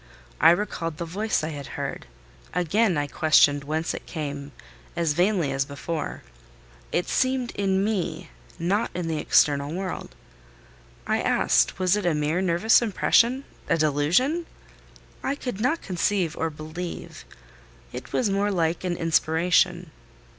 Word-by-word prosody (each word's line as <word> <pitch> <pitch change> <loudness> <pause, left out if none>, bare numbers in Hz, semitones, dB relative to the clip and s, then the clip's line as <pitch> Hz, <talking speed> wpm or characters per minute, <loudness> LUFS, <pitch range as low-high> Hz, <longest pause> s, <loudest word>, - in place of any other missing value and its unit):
I 160 - +7
recalled 170 -3 0
the 170 - -4
voice 205 +3 -1
I 155 - -2
had 145 -3 -7
heard; - - -5 0.5
again 180 +2 +2
I 145 - 0
questioned 145 -2 +4
whence 155 +3 -2
it - - -8
came, 145 -2 -5 0.4
as 165 -3 +1
vainly 175 -3 +1
as 135 0 0
before: 145 +3 -5 0.7
it 175 - 0
seemed 260 -2 0
in 195 -1 0
me—not 180 0 -2
in 175 -2 -2
the 160 -2 -1
external 145 -1 +3
world. 185 +2 -5 0.9
I - - 0
asked - - +2
was 185 +1 +2
it 205 -4 -1
a 165 - +2
mere 150 +4 0
nervous 190 +6 +4
impression—a 235 0 +1
delusion? 165 - +1 0.7
I 275 - -1
could 245 -7 -5
not 260 +8 0
conceive 180 -2 0
or 165 - -1
believe: 155 +3 -7 0.7
it 125 0 -8
was 245 - +1
more 200 +1 +1
like 170 -2 0
an 175 -2 -2
inspiration. 165 +1 +2
175 Hz, 135 wpm, -25 LUFS, 155-200 Hz, 0.9 s, I